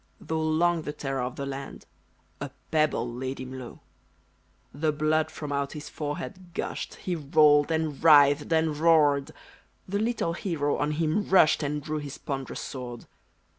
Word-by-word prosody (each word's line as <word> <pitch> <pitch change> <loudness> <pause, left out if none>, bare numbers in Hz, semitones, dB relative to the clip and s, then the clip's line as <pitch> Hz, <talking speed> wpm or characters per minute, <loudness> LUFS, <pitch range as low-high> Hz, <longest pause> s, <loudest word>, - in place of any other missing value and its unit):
Though 160 0 -3
long 165 +2 +2
the 150 -1 -5
terror 135 -3 -3
of 125 +1 -3
the 140 - -4
land, 140 0 -7 0.5
A - - -4 0.2
pebble 155 -6 +2
laid 130 +3 -5
him 130 0 -7
low. 125 - -10 0.9
The 155 +2 0
blood 155 +1 +1
from 150 -2 -7
out 140 0 -1
his 150 -1 -7
forehead 175 +4 -6
gushed. - - -4
He 180 - -3
rolled, 145 -1 +4
and 160 -3 -1
writhed, 145 -1 +6
and 160 -1 +2
roared: 150 -3 +4 0.6
The 200 +2 -1
little 220 -6 0
hero 165 -7 -1
on 150 +1 0
him 160 +6 0
rushed, 180 -5 +5
And 150 0 -2
drew 155 +1 -3
his 145 -1 -7
ponderous 135 -2 -5
sword. 125 -3 -7
150 Hz, 160 wpm, -27 LUFS, 140-160 Hz, 0.9 s, writhed